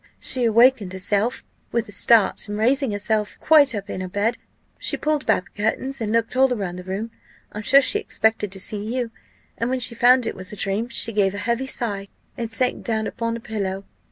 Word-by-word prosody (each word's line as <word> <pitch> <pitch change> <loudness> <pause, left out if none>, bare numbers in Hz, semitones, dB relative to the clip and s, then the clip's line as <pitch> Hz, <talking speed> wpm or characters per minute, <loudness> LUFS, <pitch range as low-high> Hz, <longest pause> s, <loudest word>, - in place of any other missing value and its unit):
She 250 -2 +1
awakened 230 -3 +4
herself 200 +5 0 0.3
with 235 -1 0
the 205 - -12
start; 220 +1 +3
and 205 - -3
raising 265 +4 +2
herself 210 +1 -2
quite 290 -6 +5
up 200 -1 -5
in 185 - -5
her 185 - -4
bed, 205 +5 0 0.4
she - - 0
pulled 305 -2 -1
back 185 - +2
the 205 - -8
curtains, 260 +5 -1
and 215 -1 -2
looked 230 +1 0
all 265 +1 +4
round 195 -7 -3
the - - -8
room. 195 +5 -4 0.4
I'm 210 - -6
sure 275 +5 +5
she 415 +11 +5
expected 220 - 0
to 190 - -7
see 205 +2 -3
you; 245 -3 -2 0.5
and 230 - -1
when 260 0 -1
she 235 -1 +1
found 245 +2 +4
it - - -2
was 185 0 -7
a - - -7
dream, 205 +4 -1
she 230 -1 -2
gave 200 -2 +1
a 205 0 -5
heavy 240 +3 -1
sigh, 205 -7 -3 0.3
and 230 -1 -5
sank 250 +2 0
down 220 -1 -1
upon 230 +1 -3
her - - -5
pillow. 195 -3 -4
225 Hz, 215 wpm, -22 LUFS, 205-245 Hz, 0.5 s, quite